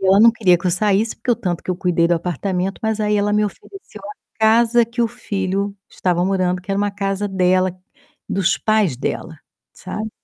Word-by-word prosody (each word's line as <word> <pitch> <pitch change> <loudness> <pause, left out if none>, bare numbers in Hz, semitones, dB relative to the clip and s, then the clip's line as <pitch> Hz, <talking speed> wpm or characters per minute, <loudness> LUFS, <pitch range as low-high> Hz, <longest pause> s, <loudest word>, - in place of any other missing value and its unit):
E 195 - -1
ela 195 +1 +5
não 230 - +8
queria 195 -6 +3
que 170 - -5
eu 180 - +3
saísse, 210 +4 +1
porque 250 - -3
o 235 - +3
tanto 180 -7 -3
que - - -4
eu 180 - -1
cuidei 175 -2 +1
do 175 - +3
apartamento, 180 +3 -2
mas 220 -1 -1
aí 210 0 +1
ela 205 0 +1
me 210 0 +2
ofereceu 210 - -9
a 205 +1 -13
casa 230 +2 +4
que 235 +1 -2
o 230 - +1
filho 200 -3 -3
estava 175 -1 0
morando 185 -1 0
que 200 - -8
era 195 - 0
uma 205 0 0
casa 200 0 -2
dela, 185 -1 +1 0.5
dos 195 -3 +1
pais 215 - +1
dela, 160 +5 -4 0.4
sabe. 215 +3 -6
195 Hz, 210 wpm, -20 LUFS, 185-215 Hz, 0.5 s, não